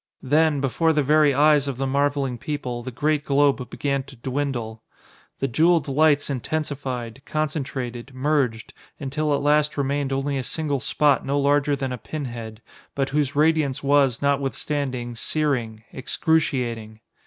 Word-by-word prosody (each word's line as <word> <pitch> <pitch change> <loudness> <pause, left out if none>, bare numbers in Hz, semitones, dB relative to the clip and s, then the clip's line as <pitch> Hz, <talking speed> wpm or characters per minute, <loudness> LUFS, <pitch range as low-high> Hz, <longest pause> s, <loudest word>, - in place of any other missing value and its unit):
Then, 150 +1 +2
before 160 +5 +2
the 150 -1 +2
very 150 +1 +4
eyes 145 +1 +4
of 135 -3 -3
the 135 - -1
marveling 140 -2 0
people, 125 -3 -4
the 125 - -6
great 145 +4 0
globe 140 -3 +2
began 140 0 -1
to 135 - -13
dwindle. 125 -3 -3 0.6
The 135 - -1
jeweled 160 +4 +3
lights 145 +1 +3
intensified, 135 -4 -4
concentrated, 135 -5 -3
merged, 130 -4 -1 0.3
until 150 +2 -2
at 140 0 +1
last 150 0 +2
remained 140 0 -1
only 135 +1 -1
a - - -3
single 145 +1 -2
spot 145 +1 +2
no 140 +1 0
larger 145 +1 +2
than 135 -1 -3
a 125 - -4
pin 150 +5 -5
head, 115 -3 -8 0.3
but 135 -1 0
whose 145 -1 0
radiance 150 -3 +2
was, 140 -3 +3
notwithstanding, 140 -3 -1
searing, 120 -6 -1
excruciating. 125 -7 -1
140 Hz, 145 wpm, -23 LUFS, 130-150 Hz, 0.6 s, very